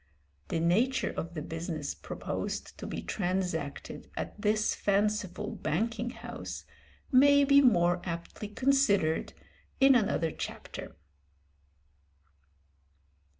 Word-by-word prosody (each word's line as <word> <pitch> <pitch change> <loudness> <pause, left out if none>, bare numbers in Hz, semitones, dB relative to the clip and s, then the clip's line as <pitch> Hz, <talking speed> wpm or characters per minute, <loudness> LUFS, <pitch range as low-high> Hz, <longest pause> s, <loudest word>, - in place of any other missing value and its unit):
The 165 - -1
nature 220 +11 +2
of 170 +1 -5
the 155 - -3
business 160 -2 -4
proposed - - -5
to - - -5
be - - -5
transacted 180 -6 -3
at - - -3
this 215 0 +2
fanciful 210 0 0
banking 230 +2 -1
house 245 - -7 0.5
may 285 +2 +7
be 280 0 +6
more 175 -8 +4
aptly 170 +4 -5
considered 210 - +2 0.5
in 270 0 +7
another 205 -9 +2
chapter. - - -7
205 Hz, 100 wpm, -30 LUFS, 170-245 Hz, 0.5 s, may